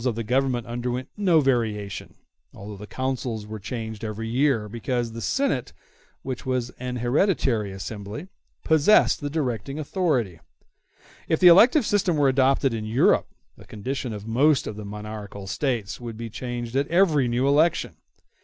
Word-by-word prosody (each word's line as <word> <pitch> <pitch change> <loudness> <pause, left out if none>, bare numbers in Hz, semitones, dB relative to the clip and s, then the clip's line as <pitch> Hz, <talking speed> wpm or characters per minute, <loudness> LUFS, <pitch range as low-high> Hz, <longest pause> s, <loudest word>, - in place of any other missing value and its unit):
In - - -6
Rome 125 -4 +1
the 115 - -3
principles - - -13
of - - -15
the 125 - +1
Government 130 -3 +1
underwent 120 +2 -4
no 185 -6 +3
variation, 110 -7 -1 0.4
although 105 +1 -8
the 105 +2 -10
Consuls 125 -4 -3
were 110 0 -7
changed 110 +1 -6
every 110 +1 -4
year, 125 -2 +1
because 120 +2 -2
the 115 +1 -7
Senate, 205 - -1 0.5
which 130 -3 -5
was 125 -2 -2
an 125 0 -4
hereditary 120 - +1
assembly, 105 - -7 0.4
possessed 160 +4 +4
the 145 - -3
directing 135 -3 -3
authority. 140 - -1 0.9
If 160 - +1
the 180 - +8
elective 230 - +6
system 190 -6 +1
were 140 -2 +4
adopted 135 0 +2
in 110 -1 -3
Europe, 110 +4 +3 0.3
the - - -15
condition 125 +3 -4
of 105 -1 -7
most 135 +6 +3
of 105 - -5
the 105 0 -7
monarchical 105 -1 -7
States 115 0 -2
would 115 -2 -7
be 115 -1 -6
changed 120 0 -5
at 140 +1 +1
every 165 -7 +3
new 120 +3 +1
election. 150 +4 +2
125 Hz, 170 wpm, -24 LUFS, 110-140 Hz, 0.9 s, the